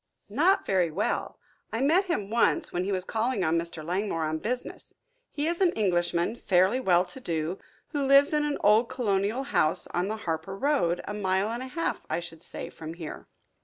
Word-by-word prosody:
"Not 330 - +3
very 185 -3 +2
well 185 +7 -2 0.3
I 225 - -2
met 330 +8 +4
him 210 - -2
once, 235 0 +2
when 175 - 0
he 200 - -1
was 185 -2 0
calling 225 +1 -1
on 165 +1 +2
Mr. 165 -2 -5
Langmore 180 -1 -1
on 155 0 -2
business. 250 +7 -4 0.3
He 290 - -3
is 340 +2 -1
an 365 -3 +5
Englishman, 175 0 0
fairly 190 +6 +3
well 180 -7 +3
to 180 +9 -7
do, 170 -4 -2 0.3
who 285 -3 -1
lives 280 +2 +6
in 300 0 +2
an 295 -1 -1
old 215 +3 +5
colonial 220 -1 0
house 160 - +1
on 175 +2 0
the 220 +1 -3
Harper 165 +3 -3
road, 230 - +1
a 205 - -3
mile 195 0 0
and 235 +2 -4
a 260 - -5
half, 330 +6 -2
I 160 - 0
should 170 -2 -10
say, - - -6
from 160 +1 -8
here." 165 -3 -8
200 Hz, 200 wpm, -27 LUFS, 175-260 Hz, 0.3 s, lives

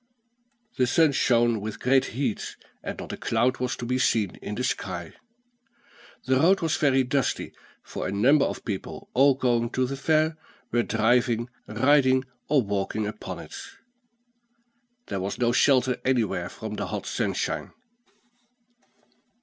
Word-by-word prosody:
The 125 - +4
sun 160 +3 +4
shone 120 -4 +2
with 105 0 -5
great 130 +1 +3
heat, 130 -7 -2 0.3
and - - -5
not - - -7
a - - -5
cloud 120 +3 +1
was 125 0 -1
to 120 - -6
be 125 +2 0
seen 110 -6 +1
in 105 - -6
the 125 - -3
sky. 90 -9 -3 1.1
The 130 +1 +3
road 180 +8 +4
was 160 -2 +1
very 135 -3 +3
dusty; 135 0 -1 0.3
for - - -5
a - - -3
number 135 +9 +4
of - - -5
people, 100 -5 -6
all 135 +1 +5
going 120 -3 +1
to 130 - +1
the 135 +2 -4
fair, 155 +3 +1 0.3
were 120 - +3
driving, 120 +1 +1 0.2
riding, 130 -2 +3 0.2
or 140 -3 +4
walking 100 +1 -2
upon 105 - -6
it. - - -11 1.5
There 95 - -4
was 95 +2 -3
no 120 -1 +2
shelter 130 -1 +3
anywhere 125 -5 0
from - - -7
the - - -3
hot - - -4
sunshine. - - -2
125 Hz, 150 wpm, -26 LUFS, 115-135 Hz, 1.5 s, all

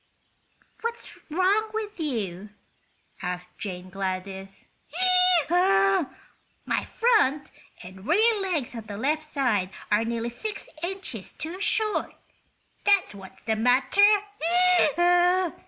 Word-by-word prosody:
"What's 465 +1 -5
wrong 385 +7 +2
with 425 -3 -5
you?" 210 - -3 0.7
asked 180 0 -5
Jane 185 -2 -6
Gladys. 190 0 -5 0.8
"My 195 - +3 0.8
front 420 - +1 0.3
and 190 +4 -12
rear 430 +6 +3
legs 335 -11 -2
on 225 -2 -8
the 205 -2 -6
left 300 +7 0
side 250 -11 0 0.2
are 210 +2 +3
nearly 230 0 -2
six 415 - -6
inches 345 - -4
too 340 +5 -6
short, 430 0 0 0.7
that's 400 - +4
what's 190 -1 -12
the 220 0 -1
matter! 250 - +2
250 Hz, 100 wpm, -26 LUFS, -, 0.8 s, that's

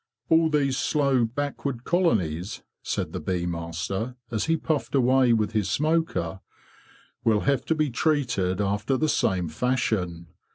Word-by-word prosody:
"All 160 0 +5
these 140 -3 +1
slow, 140 -5 +2
backward 140 0 -3
colonies,' 105 - 0 0.2
said - - -3
the - - -3
bee 90 -2 -2
master, 90 +7 -3 0.2
as 110 -3 -1
he 165 0 +2
puffed 150 -3 -2
away 130 -1 +4
with 110 -2 +2
his 110 -4 0
smoker, 155 - 0 0.8
"will 110 -2 +3
have 140 -3 +1
to 160 - +1
be 155 -3 0
treated 120 - 0
after 105 +6 0
the 155 - +1
same 95 - +1
fashion. 90 -3 -1
120 Hz, 140 wpm, -26 LUFS, 95-145 Hz, 0.8 s, All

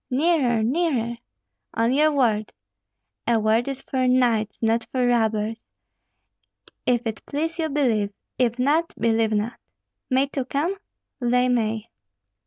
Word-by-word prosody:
Nearer, 260 -5 +2
nearer!" 240 -4 0 0.6
"On 230 +2 +2
your 305 +3 +4
word." 225 -7 +1 0.7
"A 235 -1 +3
word 220 +3 +2
is 275 -1 -4
for 255 -1 0
knights, 235 -4 +2
not 225 0 +1
for 255 -2 +1
robbers. 225 -2 0 1.2
If 245 -1 +2
it 225 -1 -4
please 325 +4 -2
you, 320 -1 0
believe; 240 -8 +1 0.3
if 240 -2 +2
not, 300 +6 +1
believe 225 -1 +2
not." 215 +2 -1 0.5
"May 260 +1 +3
two 275 -2 -4
come?" 295 +8 -1 0.5
"They 250 0 +2
may." 225 -2 -1
245 Hz, 130 wpm, -24 LUFS, 225-275 Hz, 1.2 s, your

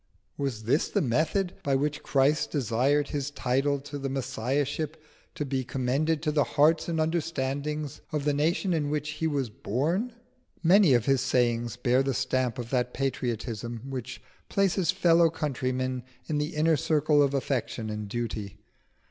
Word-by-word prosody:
Was 135 -6 -3
this 130 +8 +1
the - - +1
method 160 - +1
by 140 -1 +1
which 150 +2 -1
Christ 140 +2 +2
desired 140 +2 +1
His 140 -1 -2
title 140 +1 0
to 145 +1 -7
the 135 0 -3
Messiahship 135 +4 -2 0.4
to 150 - -2
be 135 -1 -1
commended 135 +5 0
to 155 - +1
the 150 -1 +3
hearts 155 +5 +3
and 165 -1 -1
understandings 150 -2 -2
of 150 -2 -2
the 145 - +2
nation 165 +6 +1
in 150 -3 0
which 150 0 -2
He 155 +1 -1
was 140 -7 -1
born? 165 - -1 0.5
Many 175 -4 +6
of 120 -1 +1
His 135 -2 +3
sayings 120 -2 +1
bear 125 +1 +3
the 135 -1 -1
stamp 130 -2 0
of 120 -1 -6
that 125 -1 0
patriotism 120 -2 -3
which 125 -1 -5 0.3
places 195 -2 +1
fellow 170 -3 +5
countrymen 130 -4 -2 0.2
in 150 -2 -1
the 150 +2 -2
inner 155 +1 +3
circle 150 +1 +3
of 140 -1 +2
affection 115 -5 -2
and 105 -1 -4
duty. 110 -2 -4
140 Hz, 160 wpm, -28 LUFS, 125-155 Hz, 0.5 s, Many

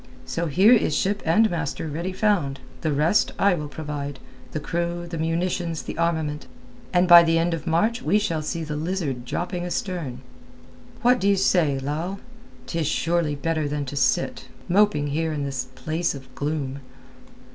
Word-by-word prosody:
So 170 0 -2
here 190 - +6
is 210 -10 +3
ship 200 +5 0
and 220 +7 +5
master 160 -2 -3
ready 170 +5 -3
found; 185 -9 +1 0.2
the 155 - 0
rest 150 +8 +2
I 200 -1 +4
will 150 -4 -3
provide—the 145 0 -7
crew, 170 +2 -2
the 170 -1 -5
munitions, 165 0 -1
the - - -6
armament, 160 -3 -1 0.4
and 180 0 +3
by 175 -1 +11
the 165 -1 +2
end 170 +1 +1
of 165 +1 -5
March 215 +9 +1
we 210 - +2
shall 195 -7 -1
see 165 +2 -3
the 150 -1 -4
Lizard 150 -6 -2
dropping 175 +6 -3
astern. 175 - -3 0.8
What 250 +1 +5
do 195 - +1
you 200 - +5
say, 170 -7 +3
Lal? 155 +8 -3 0.5
'Tis 165 -3 -2
surely 165 -1 0
better 155 +1 -1
than 145 0 -2
to 140 - -6
sit, 135 -2 0 0.2
moping 200 -5 +3
here 160 +3 -1
in 145 -2 -2
this 135 -2 -3
place 160 +4 -1
of 130 -2 -12
gloom." 145 -2 -3
165 Hz, 170 wpm, -24 LUFS, 150-180 Hz, 0.8 s, by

